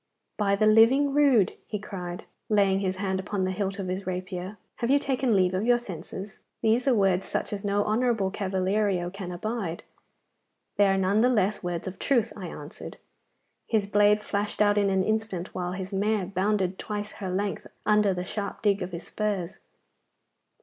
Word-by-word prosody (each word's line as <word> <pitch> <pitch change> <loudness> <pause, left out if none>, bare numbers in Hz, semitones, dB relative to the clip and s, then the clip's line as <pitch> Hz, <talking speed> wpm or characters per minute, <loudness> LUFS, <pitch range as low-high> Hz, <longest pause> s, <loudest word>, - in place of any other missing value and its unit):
'By 200 -1 +2
the 215 +2 +2
living 240 +6 +5
rood!' 275 -9 +4
he 210 - -3
cried, 180 -4 -6 0.3
laying 200 -2 +3
his 190 -1 -1
hand 190 0 -1
upon 195 0 -2
the 185 - -1
hilt 195 +1 -2
of 195 -2 -4
his 185 +2 -4
rapier,' 185 +2 -4 0.2
have 235 - -1
you 280 - +6
taken 265 -4 +1
leave 185 -1 +3
of 185 +2 0
your 240 +1 +4
senses? 195 -1 -8 0.2
These 230 +4 +2
are 265 - +5
words 195 -2 +2
such - - -2
as 200 - -4
no 205 0 +1
honourable 220 -3 +1
cavaliero 190 -1 0
can 190 -2 -6
abide.' 190 -2 -4 0.9
'They 205 - +5
are 195 0 +2
none 195 +3 +2
the 250 - +4
less 210 -4 +1
words 175 -2 -3
of 190 0 -6
truth,' 245 -6 +1
I 190 -4 -6
answered. 150 -2 -9 0.7
His 215 -3 +1
blade 205 +1 +3
flashed 205 0 -2
out 205 0 +4
in 200 -1 +2
an 190 -1 +2
instant, 215 -4 -2
while 180 -1 -3
his 190 +1 -6
mare 205 0 +1
bounded 190 0 0
twice 210 0 -4
her 190 - -3
length 195 +2 -2 0.2
under 210 -1 +4
the 180 -1 -3
sharp 205 +3 -5
dig 205 -1 +2
of 180 0 -4
his 170 - -6
spurs. 205 -4 -3
200 Hz, 185 wpm, -27 LUFS, 185-215 Hz, 0.9 s, you